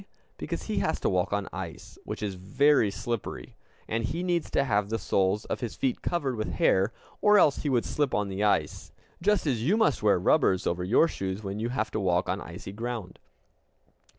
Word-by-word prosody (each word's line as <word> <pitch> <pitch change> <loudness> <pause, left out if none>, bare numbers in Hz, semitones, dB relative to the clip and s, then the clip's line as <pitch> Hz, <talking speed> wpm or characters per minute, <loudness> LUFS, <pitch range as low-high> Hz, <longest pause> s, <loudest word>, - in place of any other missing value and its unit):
Because - - -4
he - - -1
has - - 0
to - - +1
walk 90 0 0
on 100 -1 -1
ice, - - -7
which - - -5
is 100 -2 -2
very 110 +6 +3
slippery, 100 - -5 0.3
and 115 +1 -1
he 165 +10 -2
needs 175 -2 0
to - - +2
have 105 -6 0
the 115 - 0
soles 95 +1 0
of - - -3
his 120 -3 -4
feet 130 -2 -1
covered 145 -7 -1
with 110 - -3
hair, 95 +4 +3 0.3
or 210 0 +6
else 150 -7 +5
he 150 - -2
would 125 -3 +1
slip 145 -4 0
on 105 -1 0
the 95 +1 -3
ice, 105 - 0 0.3
just 205 +1 +2
as 125 -7 0
you 175 - +2
must 220 - +2
wear 105 -3 +4
rubbers 95 - +2
over 90 +1 -1
your 110 - +4
shoes 95 -5 -4
when 100 +1 -4
you 115 +2 -1
have 130 - -2
to 110 - -2
walk 90 -2 +1
on - - -1
icy - - -8
ground. 115 -3 -5
110 Hz, 205 wpm, -28 LUFS, 95-140 Hz, 0.3 s, or